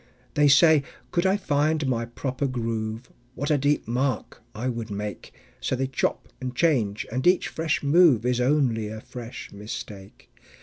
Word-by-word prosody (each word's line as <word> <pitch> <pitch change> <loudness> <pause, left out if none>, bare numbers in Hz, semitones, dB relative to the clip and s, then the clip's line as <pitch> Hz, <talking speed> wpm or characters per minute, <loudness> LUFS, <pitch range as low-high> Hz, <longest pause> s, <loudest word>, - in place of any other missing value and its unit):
They 150 0 +4
say: 155 +2 +6 0.3
"Could 175 +2 +2
I 190 +2 +3
find 155 -4 +1
my 120 -3 0
proper 130 +3 -3
groove, 115 -1 -3 0.2
What 145 +3 -2
a 150 - +4
deep 145 -1 +1
mark 125 0 -2
I 120 +4 -3
would 115 -3 -3
make!" 105 -2 -5 0.3
So - - -1
they 135 +1 0
chop 130 -1 -1
and 130 -1 -4
change, 120 -11 +1
and 130 +7 0
each 180 +1 +3
fresh 160 -2 -1
move 145 -6 +5
Is 125 0 +1
only 125 -5 +2
a 110 +1 -6
fresh 120 +1 -9
mistake. 100 -1 -9
130 Hz, 165 wpm, -25 LUFS, 115-145 Hz, 0.3 s, say